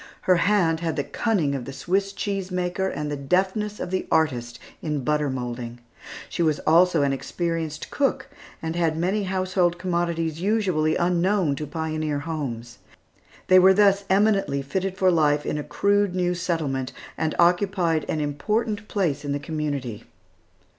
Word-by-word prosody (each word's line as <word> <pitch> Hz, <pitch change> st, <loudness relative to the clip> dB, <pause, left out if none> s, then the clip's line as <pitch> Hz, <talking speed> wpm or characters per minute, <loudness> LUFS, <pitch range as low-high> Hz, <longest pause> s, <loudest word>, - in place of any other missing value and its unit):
Her 185 Hz, -1 st, +3 dB
hand 170 Hz, -3 st, +2 dB
had 165 Hz, -2 st, -2 dB
the 145 Hz, -, -1 dB
cunning 180 Hz, -10 st, 0 dB
of 130 Hz, -3 st, -4 dB
the 135 Hz, -, -6 dB
Swiss 195 Hz, +7 st, -1 dB
cheese 195 Hz, -2 st, -3 dB
maker, 180 Hz, +1 st, -1 dB
and 150 Hz, -4 st, -3 dB
the -, -, -1 dB
deftness 190 Hz, +8 st, 0 dB
of 175 Hz, -, -4 dB
the 185 Hz, -, -2 dB
artist 125 Hz, -7 st, +1 dB, 0.2 s
in 150 Hz, -4 st, -2 dB
butter 150 Hz, +1 st, +1 dB
moulding. 120 Hz, -2 st, -5 dB, 0.5 s
She -, -, -4 dB
was 155 Hz, -3 st, +2 dB
also 170 Hz, -1 st, +4 dB
an 140 Hz, -1 st, +1 dB
experienced 165 Hz, +1 st, -3 dB
cook, 280 Hz, -1 st, 0 dB, 0.4 s
and 160 Hz, 0 st, -3 dB
had 165 Hz, -2 st, +1 dB
many 190 Hz, +5 st, 0 dB
household 185 Hz, -2 st, 0 dB
commodities 170 Hz, -2 st, -1 dB
usually 185 Hz, -7 st, +1 dB
unknown 175 Hz, -2 st, +1 dB
to 150 Hz, -, -4 dB
pioneer 155 Hz, -1 st, -2 dB
homes. 130 Hz, -7 st, -5 dB, 0.7 s
They 185 Hz, 0 st, +7 dB
were 190 Hz, +1 st, +6 dB
thus 200 Hz, 0 st, +4 dB
eminently 195 Hz, -8 st, +2 dB
fitted 190 Hz, +6 st, -2 dB
for 185 Hz, -1 st, +4 dB
life 150 Hz, -3 st, +2 dB
in 150 Hz, -, -2 dB
a -, -, -3 dB
crude 200 Hz, +5 st, +1 dB
new 180 Hz, -1 st, +1 dB
settlement, 150 Hz, -7 st, -2 dB, 0.2 s
and 160 Hz, -1 st, -1 dB
occupied 175 Hz, -2 st, +2 dB
an 155 Hz, -, -1 dB
important 210 Hz, +9 st, -1 dB
place 170 Hz, -9 st, -1 dB
in 145 Hz, -1 st, -2 dB
the 145 Hz, -, -2 dB
community. 145 Hz, -6 st, -4 dB
170 Hz, 160 wpm, -24 LUFS, 150-190 Hz, 0.7 s, They